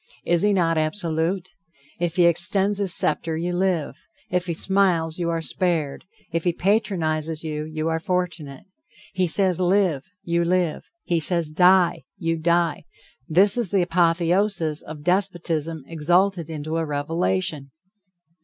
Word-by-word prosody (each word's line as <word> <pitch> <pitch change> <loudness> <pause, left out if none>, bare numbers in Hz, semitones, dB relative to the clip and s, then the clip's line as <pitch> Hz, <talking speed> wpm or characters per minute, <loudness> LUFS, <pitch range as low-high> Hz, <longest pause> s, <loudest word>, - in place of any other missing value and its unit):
Is 170 0 +2
he 210 - +3
not 165 -4 +1
absolute? 165 +2 -2 0.5
If 175 -1 -1
he 180 -2 +4
extends 195 +4 +3
his 195 -3 +1
scepter, 160 0 +3
you 175 +2 -2
live; 175 -4 -1 0.3
if 180 0 0
he 170 - -2
smiles 180 -3 +1
you 170 -1 -1
are 165 -1 -2
spared; 160 -6 -2 0.3
if 165 0 -1
he 175 - +1
patronizes 165 -6 -1
you, 155 -1 -4
you 155 0 -4
are 160 0 0
fortunate. 170 -6 -3 0.5
He 185 -1 0
says, 185 +1 +1
live! 180 -5 +1
you 170 -1 0
live. 175 -2 -1
He 170 -1 0
says, 165 -1 +1
die! 180 +2 +3
you 165 0 -2
die. 170 -1 0 0.4
This 195 +7 +3
is 230 -6 -1
the 195 -1 +2
apotheosis 170 -1 +1
of 150 -1 -10
despotism 170 -4 -1
exalted 170 +2 0
into 155 +1 -4
a 165 - -1
revelation. 145 - -2
170 Hz, 145 wpm, -23 LUFS, 160-185 Hz, 0.5 s, he